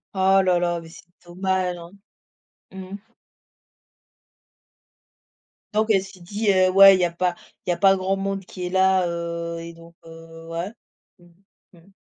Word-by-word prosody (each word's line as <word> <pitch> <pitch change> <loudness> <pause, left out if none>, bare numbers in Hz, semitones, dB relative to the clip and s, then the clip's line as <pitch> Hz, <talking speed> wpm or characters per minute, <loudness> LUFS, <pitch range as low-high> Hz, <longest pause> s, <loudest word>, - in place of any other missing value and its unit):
Oh 190 0 +4
là 180 -2 +2
là, 175 -1 -1
mais 165 - -13
c'est 165 - -15 0.2
dommage, 185 0 -2
hein. 170 +1 -12 0.8
Mmh 190 -1 -9
mh. - - -6 2.8
Donc 215 +1 +1
elle 195 -3 +3
s'est 195 -1 -14
dit: 205 +4 -1
«Heu, 185 0 +3
ouais, 195 +1 +8
il - - -1
y - - +2
a 170 - -2
pas 175 0 -1 0.3
il 180 - 0
y - - +2
a - - -5
pas 195 -1 +5
grand 190 +1 -1
monde 195 -1 -4
qui 180 -2 -7
est - - -5
là», 190 -1 +2
heu, 170 0 -4
et 165 0 -9
donc, 165 0 -17
heu, 165 0 -13
ouais. 170 +5 -4 0.5
Mmh, 175 0 -21 0.5
mmh. 190 +4 -22
185 Hz, 175 wpm, -23 LUFS, 170-190 Hz, 2.8 s, ouais